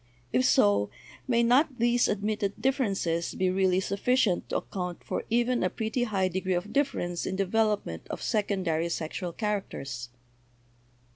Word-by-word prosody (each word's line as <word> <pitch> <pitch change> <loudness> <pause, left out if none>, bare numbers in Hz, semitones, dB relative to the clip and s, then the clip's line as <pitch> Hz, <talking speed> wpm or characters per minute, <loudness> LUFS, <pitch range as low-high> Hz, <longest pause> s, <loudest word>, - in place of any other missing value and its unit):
If 130 - +3
so, 100 0 +4 0.4
may 235 -2 +3
not 260 +3 +3
these 240 +1 +3
admitted 205 -1 -1
differences 195 - 0
be 185 -1 +1
really 185 -1 +2
sufficient 200 0 +1
to - - 0
account 180 -2 -5
for - - -3
even 240 +2 +2
a 185 - +2
pretty 225 +4 -1
high 195 -4 +1
degree 185 0 -1
of 185 +5 -3
difference 175 -12 0
in 190 - -2
development 200 - 0
of - - -4
secondary 185 -6 0
sexual 170 +2 -3
characters? 160 - -3
195 Hz, 140 wpm, -28 LUFS, 175-230 Hz, 0.4 s, so